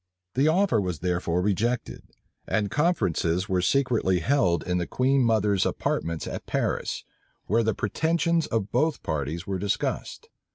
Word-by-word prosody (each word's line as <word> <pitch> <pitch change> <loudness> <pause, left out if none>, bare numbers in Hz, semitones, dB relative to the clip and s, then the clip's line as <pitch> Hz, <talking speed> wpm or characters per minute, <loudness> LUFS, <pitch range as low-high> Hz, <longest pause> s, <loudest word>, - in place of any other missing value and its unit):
The 135 +4 +2
offer 170 - +3
was 90 -5 -3
therefore 90 -1 0
rejected; 110 +5 -1 0.5
and 105 -3 0
conferences 90 - +1
were 95 -1 +1
secretly 115 -3 +2
held 90 - +2
in 90 0 -1
the 85 - -2
queen 135 +1 +2
mother's 105 -5 +2
apartments 85 -1 -2
at - - -6
Paris, - - -1 0.4
where 115 +4 +2
the 110 -1 0
pretensions 165 +7 0
of 105 -3 -2
both 150 +5 +1
parties 80 +3 -3
were 95 -1 -3
discussed. 100 +1 -3
105 Hz, 140 wpm, -26 LUFS, 90-135 Hz, 0.5 s, offer